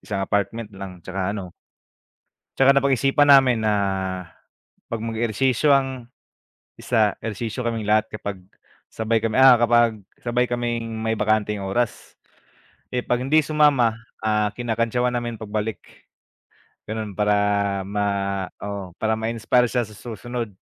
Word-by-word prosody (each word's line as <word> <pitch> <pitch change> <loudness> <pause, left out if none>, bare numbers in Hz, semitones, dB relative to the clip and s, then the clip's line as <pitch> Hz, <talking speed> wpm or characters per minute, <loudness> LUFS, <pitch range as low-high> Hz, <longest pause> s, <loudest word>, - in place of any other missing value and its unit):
isang 100 -2 -3
apartment 105 +2 -2
lang 95 -3 -9
tsaka 95 +2 -3
ano. 90 -4 -7 1.1
Tsaka 135 +1 +6
napag-isipan 140 +1 +3
namin 130 -4 +6
na 110 -1 +2 1.2
pag 115 - -2
mag 115 - -3
ehersisyo 120 +5 +1
ang 130 -3 -4 0.7
isa 110 -4 +1
ehersisyo 115 +2 -4
kaming 115 -3 -2
lahat 110 0 +2
kapag 100 -3 -6 0.5
sabay 110 0 0
kami, 115 -1 -1
ah, 130 -2 +8
kapag 120 -2 +3 0.2
sabay 120 +1 +1
kaming 120 -2 -2
may 110 0 -1
bakanteng 105 -1 0
oras, 105 +5 -3 0.7
eh, 125 - -2
pag 125 0 0
hindi 140 +4 +3
sumama, 145 -6 +3 0.3
ah, 105 -1 +2
kinakantyawan 120 +1 0
namin 120 -2 -3
pagbalik, 110 0 -3 1.1
ganun 110 -3 -5
para 105 0 +2 0.5
ma 105 0 -1 0.5
oo 100 -2 -6
para 110 0 +1
ma 110 +1 -2
inspire 115 +1 +2
siya 120 -3 0
sa 105 - -14
susunod. 120 0 -6
115 Hz, 130 wpm, -23 LUFS, 105-120 Hz, 1.2 s, ah